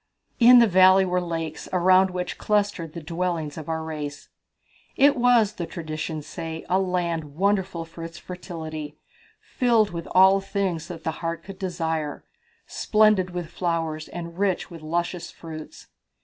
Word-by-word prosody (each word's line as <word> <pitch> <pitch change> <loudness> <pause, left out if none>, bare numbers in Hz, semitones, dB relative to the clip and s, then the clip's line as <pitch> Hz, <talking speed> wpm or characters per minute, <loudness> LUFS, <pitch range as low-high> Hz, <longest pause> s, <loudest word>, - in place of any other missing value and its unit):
In 245 +1 +9
the 235 - +8
valley 190 -1 +6
were 180 0 0
lakes, 165 -2 -4
around 185 +1 +4
which 180 0 -4
clustered 205 -6 0
the 170 - -7
dwellings 165 -2 -2
of 160 -1 -8
our 160 0 -2
race." 150 -2 -6 0.7
"It 280 +1 +5
was, 240 -4 +4
the 170 -5 -5
traditions 155 -2 -5
say, 160 0 -6
a 185 - +2
land 170 -5 -2
wonderful 190 -2 0
for 165 0 -10
its 165 +1 -8
fertility, 160 -4 -7 0.4
filled 230 -4 +2
with 170 -1 -6
all 190 +1 +6
things 190 -5 -2
that 165 -2 -8
the 160 - -1
heart 165 -1 -3
could 195 -1 -10
desire, 160 -5 -3 0.4
splendid 215 -4 +3
with 175 -2 -5
flowers 165 -3 -2
and 170 0 -8
rich 195 -3 0
with 165 -2 -9
luscious 170 +2 -2
fruits." 155 -2 -10
175 Hz, 150 wpm, -24 LUFS, 160-190 Hz, 0.7 s, In